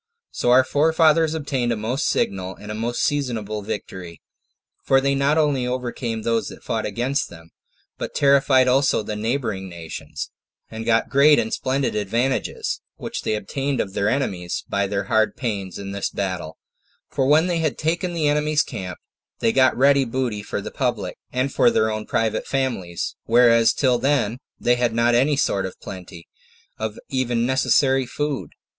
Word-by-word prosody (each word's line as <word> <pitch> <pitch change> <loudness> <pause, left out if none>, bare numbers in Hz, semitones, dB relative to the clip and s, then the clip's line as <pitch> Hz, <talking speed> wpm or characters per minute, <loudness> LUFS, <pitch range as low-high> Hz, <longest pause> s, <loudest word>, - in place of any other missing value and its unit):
So - - -1
our 130 +1 +7
forefathers 160 +2 +3
obtained 135 -6 -1
a - - +1
most 120 +7 -1
signal 95 -1 -1
and 105 +2 -7
most 120 +1 -1
seasonable 115 -7 -1
victory; 95 -4 -6 0.6
for 135 - +4
they 140 +1 +1
not 140 +3 +2
only 145 -5 +2
overcame 120 -3 -3
those 115 -1 0
that - - -10
fought 110 -1 -2
against 120 +7 -1
them, 80 -1 -14 0.5
but - - -5
terrified 140 -2 +4
also 130 -3 +3
the 105 - -4
neighboring 110 -4 -2
nations, 85 -2 -7 0.4
and 110 0 -6
got 115 -1 +2
great 145 +2 +6
and 110 - -1
splendid 135 +1 0
advantages, 115 +6 -1
which - - -5
they 110 - -1
obtained 135 +7 -2
of 95 - -2
their 100 +2 +1
enemies 95 -10 -2
by 100 0 0
their 100 0 -1
hard 110 +1 +1
pains 100 -7 -4
in 100 0 -6
this 100 0 -2
battle: 90 -5 -4 0.5
for 130 - 0
when 155 +4 +5
they 175 -2 0
had 155 -3 -1
taken 170 +3 -1
the 155 -3 +1
enemy's 150 +1 +2
camp, 90 -1 -6 0.4
they 115 - +2
got 130 +1 +3
ready 140 +1 +5
booty 120 -4 -2
for - - -4
the - - -7
public, - - -2 0.2
and 130 +2 -1
for - - +5
their 110 - +2
own 110 0 -4
private 110 -1 -1
families, 120 -11 -2
whereas 115 -1 +5
till 125 -3 +2
then 130 -5 +1 0.2
they 120 0 +2
had 120 -2 0
not 120 +1 +3
any 135 +5 +3
sort 100 -7 +1
of 95 - -12
plenty, 90 -2 -10 0.5
of 110 -1 -3
even 120 -3 0
necessary 130 0 +2
food. 140 - -3
120 Hz, 170 wpm, -22 LUFS, 105-140 Hz, 0.6 s, our